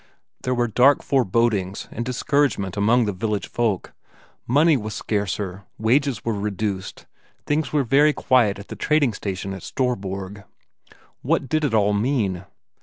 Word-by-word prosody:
There 125 0 -1
were 120 0 +1
dark 125 +5 +4
forebodings 110 -6 0
and 120 - -4
discouragement 125 -5 0
among 110 +4 +3
the 105 - -1
village 100 -1 -2
folk; 110 -6 -1 0.5
money 150 +6 +4
was 110 -4 -4
scarcer, 100 -2 -3
wages 125 +2 +1
were 115 - 0
reduced, 100 -1 -4 0.4
things 150 +1 0
were 150 -2 +2
very 145 +5 +4
quiet 120 -8 +2
at 100 - -11
the - - -6
trading 150 -6 +2
station 95 -1 -4
at 95 - -8
Storborg. 100 -6 -3 0.8
What - - 0
did 155 +4 0
it 135 -6 +1
all 105 -1 +3
mean? 100 -5 0
110 Hz, 145 wpm, -23 LUFS, 100-130 Hz, 0.8 s, dark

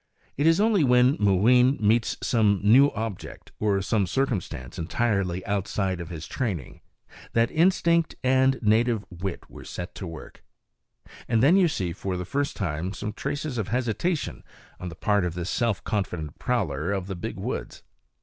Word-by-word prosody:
It 145 +3 +1
is 165 +2 +4
only 210 -5 +3
when 125 +1 +4
Mooween 120 +7 +4
meets 110 +1 +2
some 105 -4 +2
new 130 +7 +6
object, 110 -4 -6
or 100 -2 +1
some 100 -1 +1
circumstance 95 - -2
entirely 95 -1 -1
outside 100 -2 -1
of 85 - -7
his 80 -2 -7
training, 95 - -4 0.5
that 115 0 +2
instinct 170 -1 +2
and 130 +1 +3
native 110 0 +2
wit 90 +1 -5
are - - -9
set 90 0 -7
to 95 - -7
work; 80 -1 -10 0.8
and 115 +1 +2
then 155 +7 +6
you 190 -3 +5
see 90 - -2
for 95 0 -4
the 90 - -4
first 140 +8 -2
time 85 0 -3
some 105 0 -5
trace 145 +6 -4
of 120 -9 -3
hesitation 125 - -2 0.4
on 90 - -5
the 85 - -10
part 105 +2 +1
of 85 -1 -2
this 90 0 -3
self 115 -4 0
confident 90 -8 -3
prowler 90 - -1
of 95 -2 -2
the 95 0 -5
big 85 - -6
woods. - - -5
105 Hz, 165 wpm, -26 LUFS, 90-125 Hz, 0.8 s, new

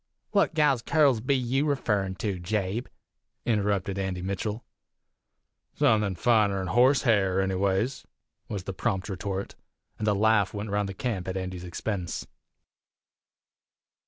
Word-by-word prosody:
"What 200 -6 +2
gal's 145 -6 +3
currls 140 -4 +3
be 135 +4 +1
you 130 +3 0
referrin' 105 -9 0
to 95 -1 -2
Jabe?" 100 +5 -2 0.6
interrupted 100 -3 0
Andy 95 -2 -3
Mitchell. 105 +4 -3 1.1
"Suthin' 105 -3 +2
finer 105 -2 +3
'n 95 - -3
horse 130 +3 +4
hair, 95 -6 +3
anyways!" 95 +5 0 0.4
was 100 -3 -4
the 95 - -5
prompt 95 0 -2
retort; 95 0 -4 0.5
and 110 - -2
a 105 - +3
laugh 105 -1 +3
went 105 0 -4
round 105 -1 0
the 95 - -6
camp 105 -6 -3
at 95 0 -2
Andy's 95 -1 -5
expense. 90 0 -4
100 Hz, 130 wpm, -27 LUFS, 95-115 Hz, 1.1 s, horse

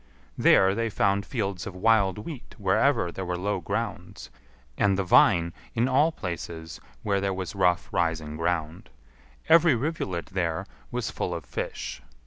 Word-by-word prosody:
There 95 0 +5
they 115 +2 -1
found 100 -1 +1
fields 100 -6 -3
of 95 - -7
wild 100 -1 +3
wheat 130 +4 -8
wherever 105 0 +2
there 95 - -5
were 90 -1 -2
low 100 +2 -1
grounds; 85 - -5 0.4
and 100 +3 +2
the 100 - +1
vine 85 -2 +4 0.2
in 120 +2 +2
all 145 +5 +3
places 85 - -6 0.2
were 100 -1 +1
there 95 -1 -1
was 95 -2 -4
rough 90 -3 +2
rising 80 -3 -1
ground. 80 0 -2 0.6
Every 165 -3 +6
rivulet 115 - -2
there 85 -4 -1 0.2
was - - -3
full - - -3
of - - -6
fish. - - -5
95 Hz, 150 wpm, -26 LUFS, 85-110 Hz, 0.6 s, Every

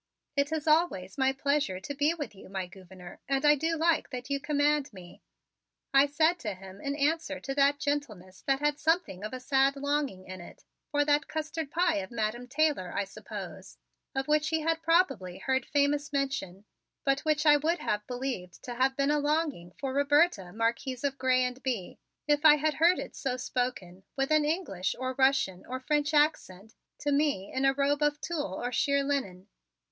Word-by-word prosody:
"It 280 +1 +1
is 315 -2 -2
always 305 - +1
my 265 0 +4
pleasure 275 -8 0
to 240 +9 -6
be 290 +2 +2
with 290 -8 -6
you, 195 - -14
my 190 -1 -3
Gouverneur, 180 -1 -13
and 275 +1 +1
I 295 - +8
do 320 +3 0
like 330 0 +2
that 250 +1 -6
you 280 - +1
command 295 0 +1
me," 185 -4 -13 0.7
I 275 +1 +6
said 315 +4 +2
to 210 -5 -4
him 190 +1 -12
in 280 0 -2
answer 310 +3 0
to 270 - -4
that 280 +1 +3
gentleness 225 -12 -4
that 270 0 +2
had 295 0 +1
something 320 - 0
of 215 - -4
a 255 - -5
sad 270 +1 +2
longing 280 -9 -2
in 185 -1 -8
it 175 - -13 0.3
for 290 -1 +1
that 295 +1 +2
custard 315 -1 -4
pie 345 - +1
of 190 -1 -4
Madam 235 +1 -3
Taylor, 280 - +1
I 200 - -1
suppose, 195 - -9 0.4
of 270 0 -1
which 300 0 +2
he 320 0 0
had 325 +1 0
probably 325 - +1
heard 265 0 -1
famous 290 +1 +1
mention, 270 -9 -2 0.4
but 275 0 +2
which 305 0 0
I 295 -1 +7
would 320 +4 0
have 210 -8 -2
believed 245 -8 -5
to 245 - -5
have 265 +2 +1
been 280 +1 +2
a 300 - +2
longing 295 - -1
for 270 -2 -3
Roberta, 285 - +2
Marquise 235 +4 -2
of 275 -1 -1
Grez 255 -1 +3
and 250 +1 -5
Bye, 235 -9 -3 0.3
if 295 0 +2
I 305 -1 +9
had 305 +1 0
heard 340 +4 +4
it - - -6
so 260 -3 -2
spoken, 245 -8 -3 0.2
with 270 +2 0
an 310 -1 +4
English 300 - -1
or 255 0 -3
Russian 265 -9 +2
or 255 +1 -4
French 295 +2 0
accent, 225 - +1 0.3
to 290 - 0
me 280 -9 0
in 265 +1 0
a 270 - +4
robe 285 +1 +1
of 295 0 +1
tulle 295 - -3
or 245 +4 -3
sheer 280 +3 +2
linen. 205 -10 -2
275 Hz, 195 wpm, -29 LUFS, 230-295 Hz, 0.7 s, I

